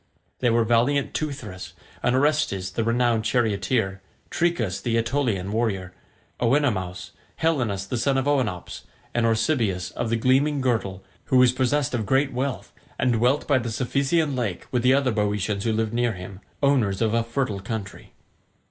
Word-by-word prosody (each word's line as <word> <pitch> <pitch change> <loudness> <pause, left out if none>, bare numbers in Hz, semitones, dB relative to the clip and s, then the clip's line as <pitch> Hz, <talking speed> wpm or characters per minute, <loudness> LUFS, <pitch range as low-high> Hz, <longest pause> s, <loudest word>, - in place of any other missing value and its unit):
They 125 - +2
were 115 0 +3
valiant 120 +5 +2
Teuthras, 125 -11 -5 0.3
and 120 - +2
Orestes 135 -10 +1
the 115 - -1
renowned 115 -1 +1
charioteer, 110 -3 0 0.3
Trechus 160 - 0
the 115 -2 0
Aetolian 115 -5 0
warrior, 100 -5 -1 0.5
Oenomaus, 115 -9 0 0.2
Helenus 120 -12 0
the 120 +4 -3
son 135 +2 +1
of 135 - 0
Oenops, 125 -11 -1 0.3
and 120 -1 +2
Oresbius 110 -6 0
of 120 - -3
the 115 - +1
gleaming 135 +5 +2
girdle, 110 -7 -1 0.2
who 130 - +2
was 125 -1 +6
possessed 130 +2 0
of 110 -4 -2
great 135 +3 +2
wealth, 130 +1 -3 0.2
and 125 -1 +2
dwelt 125 +5 +1
by 140 -3 +3
the 120 -1 -4
Cephisian 140 +6 0
lake 110 -8 -3
with 125 - +1
the 130 +2 +4
other 135 -2 +2
Boeotians 105 -1 -1
who 115 - +2
lived 110 0 -1
near 120 -1 +1
him, 95 0 -9 0.2
owners 125 -9 +2
of 110 -1 +1
a 115 - +3
fertile 115 -3 -2
country. 100 0 -6
120 Hz, 160 wpm, -24 LUFS, 105-135 Hz, 0.5 s, was